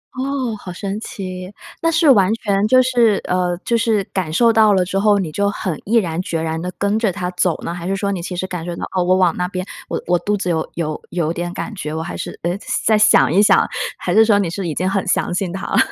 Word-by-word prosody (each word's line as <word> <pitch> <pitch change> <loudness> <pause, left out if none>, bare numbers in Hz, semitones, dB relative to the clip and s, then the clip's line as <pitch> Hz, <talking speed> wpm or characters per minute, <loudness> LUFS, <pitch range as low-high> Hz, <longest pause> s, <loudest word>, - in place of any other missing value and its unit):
哦， 260 -3 -2
好 180 - -8
神 200 +3 -4
奇， 185 -3 -7 0.3
那 330 - +2
是 330 0 +2
完 200 -4 +4
全 205 -2 0
就 255 +3 +5
是 240 -5 +3
呃， 180 -1 0
就 235 - +1
是 225 -3 +1
感 180 -5 -2
受 230 +6 +4
到 215 -1 +5
了 185 -2 +3
之 195 +2 -1
后， 205 0 +4
你 180 -6 -2
就 200 +4 0
很 185 -6 -4
毅 225 +4 0
然 175 -5 +1
决 165 -3 -3
然 160 0 -2
地 180 +1 -4
跟 200 +2 0
着 215 -5 +1
它 180 -1 -4
走 180 -2 0
呢？ 170 - -3
还 175 0 -6
是 195 - 0
说 200 0 -1
你 180 -3 -3
其 180 +1 -5
实 185 - -2
感 180 -3 -5
受 175 0 -5
到， - - -4
哦， 180 - +2
我 185 +1 +3
往 180 -3 +3
那 180 0 -1
边， 185 -1 -4 0.2
我 - - -3
我 175 -1 +2
肚 205 0 -1
子 180 -2 -1
有 160 -1 -1
有 155 -3 -3
有 165 -2 -1
点 175 0 -4
感 220 - -5
觉。 155 -6 -5
我 160 - -3
还 - - -6
是 - - -6
呃， 175 +1 0 0.3
再 220 - +4
想 210 -6 +5
一 195 - +5
想？ 210 - +4 0.3
还 175 - -2
是 220 +3 +7
说 215 -2 +4
你 190 -5 0
是 180 +1 -4
已 155 - -3
经 185 +5 -1
很 195 0 0
相 - - 0
信 180 -1 -2
它 190 +2 -5
了？ - - -1
190 Hz, 285 characters per minute, -19 LUFS, 175-210 Hz, 0.3 s, 是